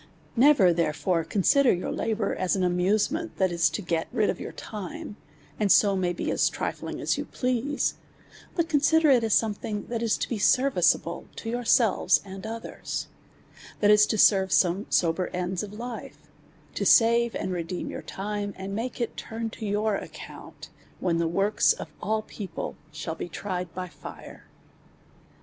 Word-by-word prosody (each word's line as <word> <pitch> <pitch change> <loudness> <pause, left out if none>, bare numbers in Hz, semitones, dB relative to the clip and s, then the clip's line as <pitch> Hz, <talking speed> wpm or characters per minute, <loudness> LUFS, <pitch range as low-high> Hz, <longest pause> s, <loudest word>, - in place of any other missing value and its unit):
Never 235 -8 +6
therefore 165 +1 0
consider 225 - +3
your 180 - -2
labour 220 -2 -1
as 185 0 0
an 190 - 0
amuse 180 +6 +2
ment, 325 +1 -4
that 190 -2 +2
is 170 -1 +3
to 210 - -4
get 165 -2 -1
rid 215 - +2
of - - -8
your - - -6
time, 205 -1 -7 0.4
and 205 -3 +2
so 200 -2 +5
may 180 -2 0
be 175 - -3
as - - +2
trifling - - -4
as - - 0
you - - -3
please; 255 +3 -1 0.6
but 335 -2 +1
consider 310 0 +4
it 245 -3 +4
as 220 -2 +3
something 210 -1 -1
that 235 -1 -2
is 230 -2 +1
to - - -2
be 230 - -3
serviceable 195 - +2
to 225 - -5
yourselves 240 -2 +3
and 195 +2 -8
others, 225 +1 -5 0.7
that 210 0 +5
is 210 0 +6
to 220 - 0
serve 190 -2 +5
some 185 +3 +2
sober 170 +2 +1
ends 180 0 -2
of 205 - -6
life, 235 +3 -7 0.6
to - - -2
save 235 -1 +5
and 185 - -3
redeem 175 0 -4
your - - -6
time, 205 0 -4
and 190 +1 -6
make 235 +5 -4
it 235 - -2
turn 225 0 -5
to 220 - -6
your 210 +1 +1
account, - - -9 0.3
when 170 -2 0
the 170 - +1
works 195 +5 +3
of - - -9
all 215 +1 -1
people 190 -7 -6 0.2
shall 160 +1 -5
be 165 - -6
tried 180 -3 -4
by 185 0 -4 0.2
lire. - - -10
205 Hz, 170 wpm, -26 LUFS, 180-230 Hz, 0.7 s, Never